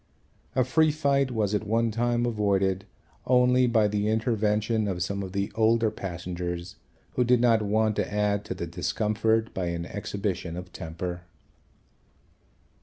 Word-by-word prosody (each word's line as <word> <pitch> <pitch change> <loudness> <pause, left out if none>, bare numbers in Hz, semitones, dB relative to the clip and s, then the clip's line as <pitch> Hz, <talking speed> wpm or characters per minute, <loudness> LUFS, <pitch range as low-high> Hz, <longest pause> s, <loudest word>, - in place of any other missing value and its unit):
A 130 - +4
free 155 +5 +3
fight 140 -3 +1
was, 110 -4 -1
at 105 +1 -1
one 115 +1 +1
time, 120 +1 +1
avoided 100 -4 +1 0.4
only 125 0 +4
by 110 -3 +3
the 105 0 -1
intervention 110 -1 +1
of 90 -3 -1
some 100 +3 -3
of 95 -1 -5
the 100 +1 -2
older 115 0 +3
passengers 90 -2 -5 0.4
who 125 - +1
did 125 0 +4
not 115 -2 +4
want 110 +1 +1
to - - -1
add 105 0 +1
to 95 - -4
the 85 - -4
discomfort 110 +6 0
by 90 -2 -2
an 85 0 -3
exhibition 95 -4 -4
of 90 0 -8
temper. 85 +2 -5
105 Hz, 150 wpm, -27 LUFS, 95-115 Hz, 0.4 s, A